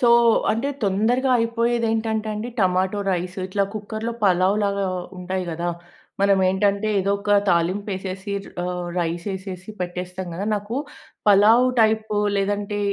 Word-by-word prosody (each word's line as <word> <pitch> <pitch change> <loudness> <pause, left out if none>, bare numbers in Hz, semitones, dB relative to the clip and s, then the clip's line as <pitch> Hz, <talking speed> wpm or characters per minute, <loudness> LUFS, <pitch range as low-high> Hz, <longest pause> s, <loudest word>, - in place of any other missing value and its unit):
so, 240 - +4 0.4
అంటే 235 +6 -1 0.2
తొందరగా 230 +7 +2
అయిపోయేది 230 0 +1
ఏంటంటే 220 -1 -1
అండి, 220 +3 -4
టమాటో 185 +2 +1
రైస్ 180 +1 -3
ఇట్లా 200 +1 0
కుక్కర్‌లో 215 +2 -4
పలావ్‌లాగా 200 +2 +2 0.3
ఉంటాయి 185 +1 -3
గదా, 170 +2 -3 0.5
మనం 200 -1 +4
ఏంటంటే 200 +2 +1
ఏదో 195 +1 0
ఒక 205 0 0 0.2
తాలింపేసేసి 190 +2 -1
ర్ - - -12
ఆహ్, 180 -1 -3
రైస్ 170 0 -2
యేసేసి 190 +1 -6
పెట్టేస్తాం 180 +1 -4
గదా, 195 +4 -3
నాకు 205 +3 -4 0.5
పలావ్ 215 +5 +6
టైపో 220 -1 +2 0.2
లేదంటే 205 +1 -1
200 Hz, 130 wpm, -23 LUFS, 185-220 Hz, 0.5 s, పలావ్